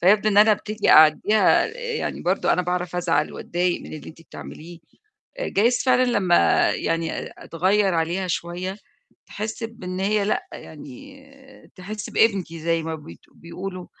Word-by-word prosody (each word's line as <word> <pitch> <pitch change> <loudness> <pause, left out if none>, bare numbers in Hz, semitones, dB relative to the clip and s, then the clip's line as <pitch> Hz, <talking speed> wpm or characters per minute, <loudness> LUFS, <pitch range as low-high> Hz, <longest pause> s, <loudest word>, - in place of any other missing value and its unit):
فيبدو 205 +4 +4
إن 200 - 0
أنا 215 +1 +7
أبتدي 215 +1 -1
أعديها، 155 +8 +5 0.3
يعني - - -4
برضه - - +1
أنا 180 - +1
باعرف 180 0 -3
أزعل 165 -4 0
وأضايق 175 0 -2
من - - -11
اللي 155 - -9
أنتِ 165 - -14
بتعمليه، 165 +1 -11 0.6
جايز 240 - +1
فعلًا 255 -1 +4
لمّا 195 -8 +3
يعني 165 0 -2
أ - - -8
أتغيّر 190 +3 +1
عليها 170 +3 -1
شوية، 180 +3 -4 0.5
تحِسّ 220 +2 -5
بإن 185 -5 -6
هي 205 +1 +1
لأ، 210 - -2
يعني 270 - -13
تحِسّ 205 +3 -7
بقيمتي 190 -7 +1
زي 165 0 0
ما 160 0 -4
بت 145 - -11
بيقولوا، 180 +2 -8
185 Hz, 145 wpm, -23 LUFS, 165-215 Hz, 0.6 s, أنا